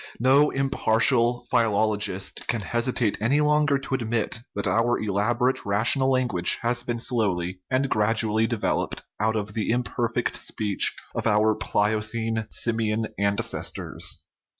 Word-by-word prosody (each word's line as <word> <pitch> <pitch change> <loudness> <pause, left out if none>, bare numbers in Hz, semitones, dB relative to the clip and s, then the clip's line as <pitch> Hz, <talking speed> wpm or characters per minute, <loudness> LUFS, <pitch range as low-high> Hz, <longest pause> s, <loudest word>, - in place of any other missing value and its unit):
No 135 +5 +4
impartial 125 -2 +2
philologist 105 -3 0
can 115 -3 -1
hesitate 120 +2 -1
any 130 +7 +2
longer 150 -1 +3
to 135 0 -6
admit 115 -3 -1 0.2
that 100 - -2
our 120 +1 +2
elaborate 115 +5 0
rational 115 +6 +2
language 125 -9 +1
has 120 +1 +1
been 120 -1 -3
slowly 95 -7 -1
and 130 +1 +1
gradually 110 -1 +1
developed 115 -3 -2 0.2
out 110 +1 +1
of 105 -1 -3
the 110 -1 -2
imperfect 120 0 -1
speech 105 -2 0 0.2
of - - -2
our 105 +1 +3
Pliocene 110 +2 -1
simian 110 -1 0
ancestors. 100 0 -1
115 Hz, 125 wpm, -25 LUFS, 105-125 Hz, 0.2 s, No